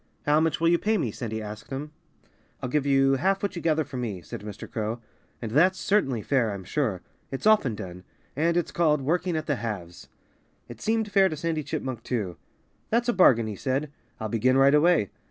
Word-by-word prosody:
"How 150 +1 +4
much 160 -1 +1
will 165 0 +3
you 170 0 +3
pay 220 +1 +1
me?" 130 - -1
Sandy 110 -1 -5
asked 105 +1 -8
him. 140 +3 -5 0.7
"I'll 125 - -4
give 145 +1 0
you 135 0 +4
half 195 +7 +1
what 200 -1 -1
you 170 - -4
gather 155 -1 +2
for 135 -2 -8
me," 105 -8 -4
said - - -8
Mr. 105 -1 -8
Crow. 110 0 -3 0.4
"And 110 - -4
that's 180 +9 +4
certainly 135 - +1
fair, 125 -6 +1
I'm 95 - -8
sure. 105 - -2 0.3
It's 135 - -5
often 210 - +4
done. 90 -3 -8 0.3
And 165 +4 +1
it's 175 - -1
called 150 -4 +2
'working 170 +5 0
at 155 - -3
the 145 - 0
halves.'" 100 -7 -6 0.6
It - - -11
seemed 220 -1 0
fair 195 -1 +5
to 155 - -5
Sandy 160 0 -1
Chipmunk, 130 -4 -4
too. 105 -8 -3 0.5
"That's 240 +2 +1
a - - +3
bargain," 125 - +5
he 110 -1 -4
said. 135 +7 -2 0.3
"I'll 110 - -3
begin 125 +4 +2
right 135 +1 +6
away. 150 - +4
135 Hz, 210 wpm, -26 LUFS, 110-170 Hz, 0.7 s, right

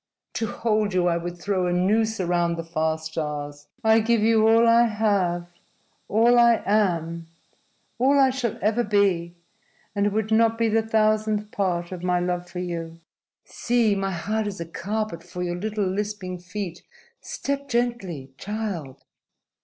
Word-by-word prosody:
To 225 - -2
hold 215 -3 0
you 180 -1 +2
I 170 -1 +2
would 175 +1 -5
throw 185 0 -1
a - - 0
noose 215 +5 +1
around 175 -1 +1
the 165 - -5
far 160 -1 -1
stars. 150 -2 -5 0.2
I 220 0 +5
give 225 0 +2
you 220 0 +4
all 230 +1 +5
I 235 +1 +5
have, 200 -6 0 0.6
all 235 +3 +4
I 235 -1 +5
am, 170 -5 0 0.7
all 270 +3 +4
I 265 -1 +5
shall 250 -3 -2
ever 220 +3 +2
be, 195 -5 +1 0.6
and 200 0 +1
it - - 0
would 215 +1 -1
not 225 0 +3
be 230 -1 +2
the 225 +1 +3
thousandth 215 -1 +1
part 175 -3 -1
of 180 -2 -6
my 180 0 +1
love 180 0 -2
for - - -9
you. 165 -2 -5 0.5
See! 235 -3 +1
My 195 -1 -1
heart 210 +5 -2
is 200 -3 -5
a 170 - -4
carpet 200 +2 -4
for 180 -1 -6
your 175 0 -2
little 210 +1 -2
lisping 190 -1 -3
feet. 180 -1 -6 0.4
Step 280 0 -4
gently, 235 - -2
child!" 200 -10 -5
200 Hz, 160 wpm, -24 LUFS, 175-220 Hz, 0.7 s, I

